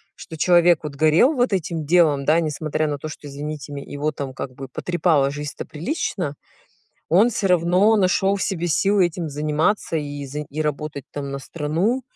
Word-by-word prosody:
что 160 - -10
человек, 175 0 +5
вот 150 -2 -6
горел 155 - +4
вот 245 -6 +1
этим 165 -3 -2
делом, 150 -4 +3
да, 160 +3 +4
не 160 - -1
смотря 155 +1 -2
на 145 - -2
то, 150 - -6
что 155 -1 -9
извините 145 +1 -6
ме 140 -1 -6
его 145 +2 -3
там 140 -2 -6
как 130 -1 -6
бы 135 0 -8
потрепала 155 -1 +1
жизнь-то 145 0 -6
прилично. 175 - -3 0.7
Он 200 +9 +5
всё 205 -3 -1
равно 180 +5 +4
нашёл 195 0 +2
в 195 - -3
себе 175 -3 -1
силы 195 +2 +3
этим 170 -1 -5
заниматься 155 +6 0
и 145 -2 -4
заи 150 +3 -5
и 155 - -4
работать 150 -2 -3
там 140 -1 -5
на 140 - -4
страну. 165 - -1
155 Hz, 190 wpm, -22 LUFS, 145-180 Hz, 0.7 s, человек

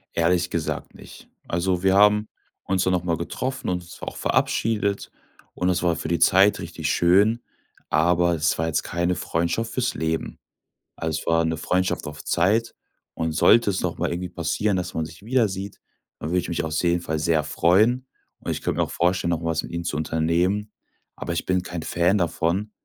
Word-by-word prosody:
Ehrlich 85 +1 +2
gesagt 85 -2 -3
nicht. - - -13 0.2
Also, 90 +1 -1
wir 95 0 +4
haben 105 +1 +4 0.3
uns 95 -1 0
dann 95 - +2
noch 90 - 0
mal 85 -2 0
getroffen 130 - -4
und 90 -1 -1
uns 85 - -13
auch - - -6
verabschiedet 105 -3 0 0.4
und 90 - -1
es 90 -1 +1
war 85 -2 +2
für - - -4
die 85 +1 0
Zeit 95 +2 +5
richtig - - -4
schön, 100 +7 +3 0.5
aber 85 +2 +3
es 80 +1 +1
war 80 - 0
jetzt 80 - 0
keine 85 +1 -1
Freundschaft 85 +9 -1
für's 125 0 0
Leben. 80 0 -3 0.6
Also, 80 -1 -2
es - - -13
war 80 0 +3
'ne 80 - 0
Freundschaft 90 0 -1
auf 75 +1 -8
Zeit 105 +7 +1 0.4
und 80 0 -2
sollte 115 +5 +5
es 95 - -1
noch - - -3
mal - - 0
irgendwie 90 +1 -3
passieren, 95 +4 -1
dass 90 0 -4
man 80 - -1
sich 80 +4 -13
wiedersieht, 100 -5 -1 0.4
dann 75 - -4
würde 90 +2 +2
ich 90 - -4
mich 85 - -1
auf 80 -1 -3
jeden 85 +1 +1
Fall 80 -2 -2
sehr 80 -1 +2
freuen 110 - +2 0.3
und - - -6
ich - - -4
könnte - - -1
mir - - +3
auch - - -10
vorstellen, 90 0 +1
noch 85 -2 0
mal 85 -1 -1
was 80 - 0
mit - - -9
ihm 85 0 -3
zu 75 -3 -2
unternehmen, 85 +7 0 0.4
aber 85 - -4
ich 85 - -2
bin 90 0 +1
kein 85 -3 -6
Fan 90 +4 +2
davon, 90 +3 -1
90 Hz, 200 wpm, -24 LUFS, 85-100 Hz, 0.6 s, Zeit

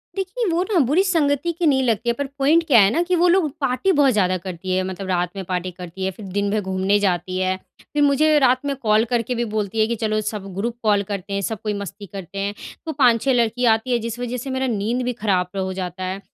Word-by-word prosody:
देखिए 390 +5 -2
वो 340 +2 +1
ना 350 - +4
बुरी 320 +9 +3
संगति 325 -3 +1
की 340 - +1
नहीं 265 -2 +3
लगती 230 0 0
है, - - +3
पर 285 +3 -3
पॉइंट 315 +5 +4
क्या 245 -6 +6
है 195 0 +6
ना 335 - +1
कि 360 0 0
वो 350 +1 +3
लोग 345 -3 +3
पार्टी 275 +9 +1
बहुत 285 -5 +4
ज़्यादा 185 -3 +2
करती 185 0 -6
हैं। 185 - +1
मतलब 190 +1 -5
रात 180 -1 0
में 195 - -4
पार्टी 180 0 -3
करती 180 +1 -8
हैं 190 - 0
फ़िर 210 - -9
दिन 200 0 0
भर 215 0 +1
घूमने 190 +1 +1
जाती 185 -1 -1
हैं, 185 0 0 0.4
फ़िर 295 -1 +2
मुझे 300 +2 +4
रात 260 +1 +3
में 280 -1 -1
कॉल 220 -3 +2
करके 240 +1 0
भी 240 0 -1
बोलती 215 +1 -2
हैं 215 - +4
कि, 235 - -1
चलो 215 -1 -1
सब 205 -2 -4
ग्रुप 230 +4 -2
कॉल 205 -2 +3
करते 200 0 -5
हैं 200 - -1
सब 215 0 -3
कोई 210 -1 -1
मस्ती 200 +1 -7
करते 195 0 -7
हैं 200 +1 -2 0.3
तो 320 - -2
5-6 255 -1 +3
लड़की 240 +1 +1
आती 225 +2 +2
हैं, 240 - +2
जिस 230 +1 -5
वज़ह 245 0 -3
से 265 +3 -6
मेरा 260 0 -1
नींद 230 +3 -1
भी 250 - -1
ख़राब 195 -4 -1
हो 190 0 -2
जाता 185 0 -5
है। 190 +1 -3
220 Hz, 255 wpm, -21 LUFS, 195-265 Hz, 0.4 s, क्या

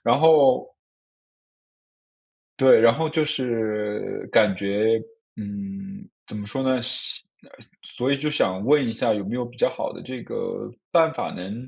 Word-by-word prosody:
然 120 +3 +3
后 150 -5 +5 1.9
对， 130 -3 +7
然 115 0 +6
后 160 +3 -1
就 155 -1 +1
是 110 -7 -3
感 105 -3 +4
觉， 105 +4 +1 0.4
嗯， 200 -1 -8 0.2
怎 105 - -7
么 105 - -6
说 135 +6 -4
呢？ 130 -2 +1
想 130 +1 -1 0.8
所 125 +3 -3
以 140 - +2
就 150 +1 -1
想 95 -10 0
问 140 +1 +3
一 - - -1
下 115 0 +1
有 100 - -4
没 - - -3
有 125 - -2
比 120 +1 -12
较 - - +3
好 - - -5
的 - - -11
这 130 -1 -7
个 470 0 -5 0.2
办 165 -2 +4
法 165 - -4
能 105 +8 -8
130 Hz, 175 characters per minute, -23 LUFS, 110-155 Hz, 1.9 s, 对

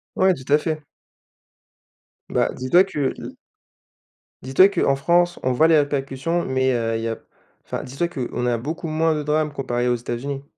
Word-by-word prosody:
Ouais 190 0 +4
tout 130 -3 -9
à 150 - +7
fait. 155 0 -3 1.5
Ben, - - 0
dis-toi 150 +9 +4
que 150 -8 -2
l' - - -9 1.1
dis-toi 135 +10 +5
qu'en 170 -8 +1
France 175 +5 +2
on 130 - 0
voit 140 +6 +4
les 160 -2 +5
répercussions 145 +4 -1
mais, 130 0 +1
heu, 115 -2 -1
il 115 - -2
y 115 - -2
a 115 - -3 0.5
enfin - - -4
dis-toi 135 +7 -2
qu'on 125 -5 -4
a 120 -1 +1
beaucoup 155 +7 -5
moins 160 0 +1
de 150 - -3
drames 150 +1 0
comparé 125 -3 -2
aux 120 - +2
États-Unis. 125 +4 -5
140 Hz, 175 wpm, -22 LUFS, 130-160 Hz, 1.5 s, à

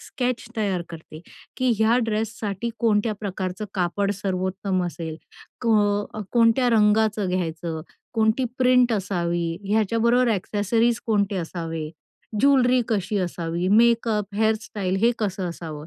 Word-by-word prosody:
sketch 250 -1 -3
तयार 195 -5 0
करते, 160 -1 -10 0.4
की 255 -1 +1
ह्या 220 +2 +4
ड्रेससाठी 215 0 -2
कोणत्या 215 -1 +2
प्रकारचं 190 -1 -4
कापड 195 +2 0
सर्वोत्तम 190 -1 -2
असेल, 165 -2 -6 0.4
क 240 - -5 0.7
कोणत्या 235 +1 +4
रंगाचं 215 -2 +3
घ्यायचं, 165 -2 -3 0.3
कोणती 220 +3 +2
प्रिंट 250 -1 +4
असावी, 175 -4 -1
ह्याच्याबरोबर 230 +4 +2
ॲक्सेसरीज 220 +4 0
कोणते 205 -3 +1
असावे, 165 -2 -4 0.5
ज्वेलरी 255 -3 +4
कशी 205 -1 0
असावी, 175 -1 -2
मेकअप, 220 -1 +3
हेअर 220 +1 +3
स्टाईल, 190 -3 -3
हे 235 +2 +4
कसं 190 -4 -2
असावं, 155 -3 -7
205 Hz, 115 wpm, -24 LUFS, 180-230 Hz, 0.7 s, ह्या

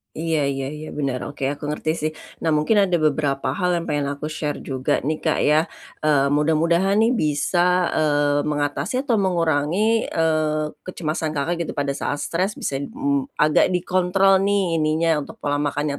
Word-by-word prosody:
Iya 160 -3 0
iya 135 -1 -2
iya, 155 +1 -8
bener, 135 -3 -2
oke, 145 -1 -9
aku 145 +1 -6
ngerti 150 +1 -2
sih. 155 +1 -1 0.3
Nah, 160 -2 0
mungkin 155 +8 +2
ada 190 -3 +3
beberapa 145 -2 0
hal 180 -2 0
yang 170 - -1
pengen 145 -3 -1
aku 150 +2 -6
share 150 -1 -4
juga 130 -1 -1
nih 155 +3 -1
Kak 160 - 0
ya. 155 +2 +3 0.4
Eee, 140 -2 +3
mudah-mudahan 165 +6 +2
nih 230 - +3
bisa, 175 +4 +1
eee, 145 -1 +2
mengatasi 145 - -1
atau 235 -6 +1
mengurangi, 180 +4 +1
eee, 155 -2 0 0.2
kecemasan 160 -3 -3
Kakak 170 +4 -1
gitu, - - -6
pada 140 -1 -1
saat 145 +1 -3
stres 185 +5 -1
bisa, 135 - -3
mmm, 280 - -2
agak 155 +4 +3
dikontrol 185 +2 +3
nih, 195 -5 +1
ininya, 155 +1 +1
untuk 145 - -7
pola 145 0 0
makan 145 0 -1
155 Hz, 170 wpm, -22 LUFS, 145-180 Hz, 0.4 s, ada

